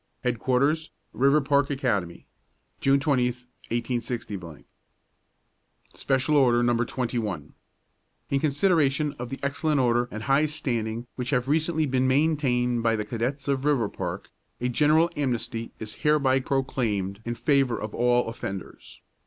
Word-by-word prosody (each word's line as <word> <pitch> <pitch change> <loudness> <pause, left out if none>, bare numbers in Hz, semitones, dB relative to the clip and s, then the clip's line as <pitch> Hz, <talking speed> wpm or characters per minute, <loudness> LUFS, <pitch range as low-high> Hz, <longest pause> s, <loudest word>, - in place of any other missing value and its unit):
HEADQUARTERS, 130 +6 +1 0.2
RIVERPARK 140 +1 +3
ACADEMY. 110 -11 -2 0.5
June 135 0 +3
20, 135 -4 +2
186. 120 -1 -4 1.7
SPECIAL 135 +2 0
ORDER, 120 -3 +4
NO. 120 0 +2
21. 120 -5 -3 0.8
In 140 - +2
consideration 150 -1 +2
of 125 0 -5
the 135 - -6
excellent 145 +1 0
order 120 -1 +2
and 110 +1 -6
high 140 +3 +3
standing 120 -6 -3
which 125 -1 -3
have 125 -2 +1
recently 160 +2 +1
been 130 -2 +1
maintained 130 -4 +2
by 115 0 +2
the 105 -1 -3
cadets 125 +6 -3
of 140 -2 +1
Riverpark, 140 -8 -1 0.3
a 125 - -1
general 155 +6 +3
amnesty 120 -4 -2
is 110 -1 -7
hereby 145 -3 +3
proclaimed 115 -7 -1
in 120 +1 -3
favor 135 -3 +2
of 105 0 -5
all 120 0 +2
offenders. 100 -4 -7
130 Hz, 125 wpm, -26 LUFS, 120-140 Hz, 1.7 s, ORDER